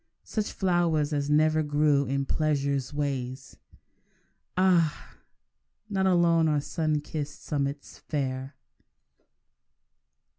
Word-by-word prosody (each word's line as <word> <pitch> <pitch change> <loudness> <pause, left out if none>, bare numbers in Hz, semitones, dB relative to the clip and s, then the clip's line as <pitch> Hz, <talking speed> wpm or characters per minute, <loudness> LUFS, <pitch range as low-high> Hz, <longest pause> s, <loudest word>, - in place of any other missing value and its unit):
Such 215 -2 -3
flowers 170 -5 +1
as 145 0 -1
never 155 +1 +3
grew 145 -1 +2
in 140 +1 -1
pleasure's 140 -3 0
ways! 135 -3 -4 1.0
Ah! 170 -7 +2 0.7
not 190 -1 +1
alone 170 -3 +4
are 150 -1 +2
sun 155 0 -1
kissed 145 -1 -6
summits 140 -1 -3
fair. 135 -1 -3
150 Hz, 90 wpm, -27 LUFS, 140-160 Hz, 1.0 s, alone